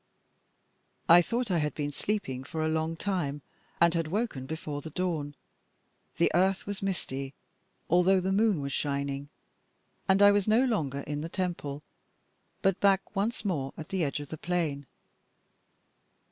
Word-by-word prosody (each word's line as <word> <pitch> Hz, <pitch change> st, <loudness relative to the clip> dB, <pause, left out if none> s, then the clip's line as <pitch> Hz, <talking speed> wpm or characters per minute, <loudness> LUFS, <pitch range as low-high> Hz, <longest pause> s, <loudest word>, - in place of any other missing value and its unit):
I 170 Hz, +1 st, +9 dB
thought 235 Hz, +4 st, -1 dB
I 175 Hz, -, +3 dB
had 150 Hz, -2 st, -1 dB
been 145 Hz, -1 st, -2 dB
sleeping 145 Hz, -7 st, -2 dB
for 155 Hz, +3 st, -3 dB
a -, -, +1 dB
long 160 Hz, +1 st, 0 dB
time 160 Hz, -7 st, -2 dB, 0.4 s
and 170 Hz, 0 st, +5 dB
had 165 Hz, -2 st, 0 dB
woken 180 Hz, -, -2 dB
before 150 Hz, -2 st, -4 dB
the 160 Hz, -, -7 dB
dawn: 155 Hz, -4 st, -2 dB, 0.8 s
the 170 Hz, -, +3 dB
earth 190 Hz, +3 st, +2 dB
was 200 Hz, -1 st, -5 dB
misty, 140 Hz, -8 st, -3 dB, 0.5 s
although 180 Hz, +3 st, +4 dB
the 185 Hz, +1 st, -1 dB
moon 205 Hz, -4 st, +3 dB
was 140 Hz, 0 st, -3 dB
shining; 140 Hz, 0 st, -2 dB, 0.8 s
and 195 Hz, +1 st, +5 dB
I 205 Hz, -, +9 dB
was 205 Hz, 0 st, +2 dB
no 225 Hz, +5 st, +4 dB
longer 150 Hz, -, -1 dB
in 145 Hz, +1 st, -4 dB
the 165 Hz, -, -4 dB
temple, 165 Hz, -6 st, -3 dB, 0.8 s
but 195 Hz, 0 st, +2 dB
back 195 Hz, 0 st, +2 dB
once 210 Hz, +4 st, -1 dB
more 140 Hz, -9 st, -1 dB
at 160 Hz, -, -8 dB
the 190 Hz, -3 st, 0 dB
edge 145 Hz, 0 st, -1 dB
of 145 Hz, -1 st, -8 dB
the 160 Hz, -, -6 dB
plain. 160 Hz, -6 st, -1 dB
165 Hz, 160 wpm, -29 LUFS, 145-195 Hz, 0.8 s, I